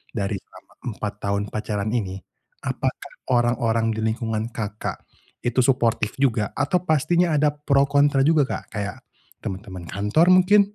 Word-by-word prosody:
dari 100 -2 -1
selama - - -19 0.2
4 105 -1 -3
tahun 100 0 -1
pacaran 105 -1 -2
ini, 100 -6 -1 0.5
apakah - - -3 0.2
orang-orang 120 -2 +2
di 110 - -3
lingkungan 110 0 -1
Kakak 105 -1 -4 0.4
itu 120 +1 0
suportif 120 -4 +2
juga 120 -6 0
atau 145 +5 +1
pastinya 160 +2 +3
ada 150 0 +3
pro 145 -1 +2
kontra 140 -1 +3
juga 150 -2 +4
Kak - - -4
kayak 105 -2 -3 0.5
teman-teman 95 -2 -6
kantor 105 - +3
mungkin 185 +3 +6
120 Hz, 140 wpm, -23 LUFS, 105-145 Hz, 0.5 s, mungkin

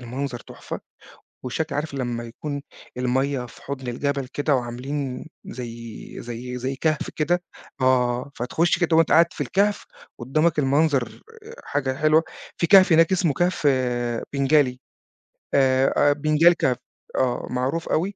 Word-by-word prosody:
المنظر 125 +1 -4
تُحفة، - - -8 0.6
والشكل 145 +4 -3
عارف 150 0 -3
لمّا 120 -3 -3
يكون 140 +4 -6 0.3
المَيَّة 130 +1 0
في - - -16
حُضن 135 -2 -6
الجبل 140 +2 -2
كده 145 0 +1
وعاملين 125 +2 -4 0.2
زَي 115 -2 -8
زَي 120 +1 -6
زَي 130 +2 -3
كهف 155 0 -1
كده. 175 +3 +1 0.4
آه، 125 0 +2
فتخش 160 +8 +1
كده 170 -2 +2
وأنت 165 -1 +4
قاعد 165 +1 +7
في - - -12
الكهف 205 +1 +1 0.3
قدامك 155 +6 +1
المنظر 140 -3 +1 0.4
حاجة 135 -2 -1
حلوة، 155 +3 +4 0.3
فيه 170 - +1
كهف 190 -1 +7
هناك 165 +3 +5
اسمه 175 -4 +2
كهف 175 +1 0 0.7
بنجالي 140 -2 +2 0.7
آآ، 135 +1 +4
benagil 155 +3 +4
cave 125 - +3 0.4
آه، 125 -2 0
معروف 130 +6 -2
أوي. 190 +5 0
140 Hz, 130 wpm, -23 LUFS, 125-155 Hz, 0.7 s, قاعد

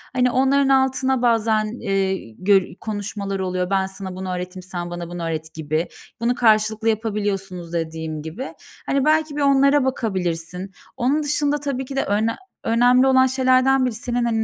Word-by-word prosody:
Hani 250 -1 +3
onların 270 +1 +3
altına 265 -1 +2
bazen, 225 -2 +2 0.2
eee, 195 - -1
gö 195 -1 +4
konuşmalar 205 -2 -4
oluyor. 185 -1 -2
Ben 195 -1 +2
sana 190 -1 -8
bunu 185 0 -4
öğreteyim, 180 +1 -6
sen 175 -1 -5
bana 175 -1 -5
bunu 175 -1 -5
öğret 160 -1 -4
gibi. 155 +1 -2 0.3
Bunu 240 +1 +1
karşılıklı 220 -1 +3
yapabiliyorsunuz 200 -5 -2
dediğim 160 -2 -3
gibi. 165 - -6 0.3
Hani 275 0 +1
belki 310 -1 +2
bir 295 - -2
onlara 275 0 +4
bakabilirsin. 180 -6 -2 0.3
Onun 275 +5 +1
dışında 295 0 0
tabii 270 -2 -3
ki 270 - -7
de 270 - +1
önem 215 +3 +1 0.3
önemli 245 +3 +4
olan 260 0 +5
şeylerden 260 0 +3
biri 245 - -1
senin 240 +1 -1
hani 225 -1 +1
220 Hz, 160 wpm, -22 LUFS, 185-260 Hz, 0.3 s, olan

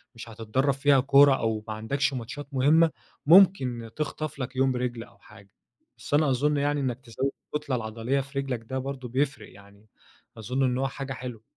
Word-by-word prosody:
مش 115 0 -10
هتتدرّب 115 +5 -1
فيها 140 0 +3
كورة، 140 +1 +6
أو 110 -3 -2
ما 110 - -4
عندكش 140 +7 -1
ماتشات 130 +4 -6
مهمة 155 +5 +4 0.3
ممكن 140 -10 +5
تخطف 155 -1 -4
لَك 130 0 -5
يوم 130 0 +2
رِجل 125 -2 -3
أو - - -19
حاجة. 100 -2 -17 0.5
بس - - -8
أنا 150 0 +4
أظن 145 +3 +1
يعني 145 +1 0
إنك 130 -3 -2
تزود 130 +2 -3 0.2
الكتلة 150 -3 -2
العضلية 115 +3 -2
في 140 +1 -5
رِجلك 130 -4 -3
ده 130 +4 -5
برضه 130 -1 -5
بيفرق، 130 -3 -2
يعني 100 +1 -18 0.5
أظن 125 +5 -2
إن 125 -1 +1
هو 135 +1 0
حاجة 135 0 -6
حلوة. 120 -3 -8
130 Hz, 180 wpm, -26 LUFS, 115-140 Hz, 0.5 s, كورة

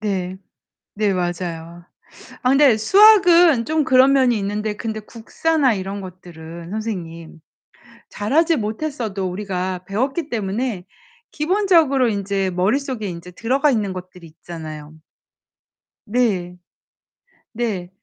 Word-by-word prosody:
네. 190 -3 -3 0.6
네 205 -1 +1
맞아요. 175 -2 -4 0.6
아 250 - +2
근데 275 -4 +5
수학은 350 - +6
좀 315 0 +1
그런 260 +1 +5
면이 255 -4 +3
있는데 210 +1 -3
근데 220 -1 -4
국사나 260 +5 0
이런 195 +1 -5
것들은 170 -2 -10
선생님, 170 -7 -6 0.7
잘하지 315 +11 +1
못했어도 220 -4 -3
우리가 185 -1 -4
배웠기 270 - -2
때문에 210 -2 -3 0.5
기본적으로 320 - +2
인제 200 -2 -1
머릿속에 215 +5 -1
인제 175 0 -8
들어가 265 +9 +1
있는 210 -6 -1
것들이 180 -1 -10
있잖아요. 155 -2 -9 1.1
네. 205 -6 0 1.0
네. 215 -7 -3
210 Hz, 250 characters per minute, -20 LUFS, 180-260 Hz, 1.1 s, 수학은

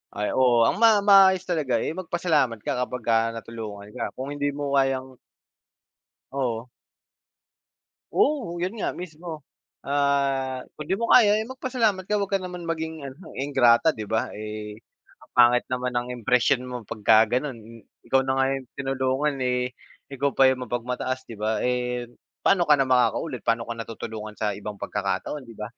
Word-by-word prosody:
Ay 105 0 -1
oo, 120 -3 +4
ang - - +1
ma 225 -2 +7
maayos 190 -2 +6
talaga, 155 -8 0
eh, - - -2
mag-pasalamat 165 -9 0
ka - - 0
kapagka 120 -2 -1 0.2
natulungan 110 -3 -8
ka, - - -4
kung 135 +2 -4
hindi 145 0 -1
mo 140 0 -4
kayang 130 -1 0 1.1
Oo. 125 -3 -2 1.4
Oo 260 - +1
yun 180 +4 -2
nga - - 0
mismo, 160 -3 -8 0.4
ah, 140 -2 0
kundi 155 +6 -3
mo 230 - -1
kaya, 210 -4 +7
eh, 220 - -2
mag-pasalamat 240 -7 -1
ka 210 - +2
huwag 200 -1 -2
ka 195 - +2
naman 180 -1 -7
maging 160 -2 -4
ano, 140 +6 -10
ingrata 135 +1 +4
'di 110 -2 -7
ba, 110 +3 -1
eh, 105 0 -7 0.4
ang - - -20
pangit 120 0 +6
naman 125 0 -2
ng 120 0 -2
impression 125 +3 +3
mo 125 -1 -6
pagka-ganon. 110 +6 +3 0.6
Ikaw 135 - +4
na 130 - +1
nga 135 0 +2
yung 135 - -9
tinulungan, 135 +1 -1
eh, 125 0 -1 0.3
ikaw 140 0 -1
pa 135 -1 +6
yung 130 -1 -2
mapag-mataas 125 +2 -3
'di 115 - -8
ba? 110 +1 -1
Eh, 125 -1 -1 0.3
pa'no 180 -3 +3
ka 150 - +6
na 135 - 0
makaka-ulit, 125 0 +1
paano 115 0 +2
ka 115 - -4
na 115 - -5
tutulungan 110 -1 -7
sa 105 -1 -2
ibang 105 0 -8
pagkakataon 105 +7 -3
'di 115 - -12
ba? 105 0 -7
130 Hz, 165 wpm, -25 LUFS, 120-160 Hz, 1.4 s, ma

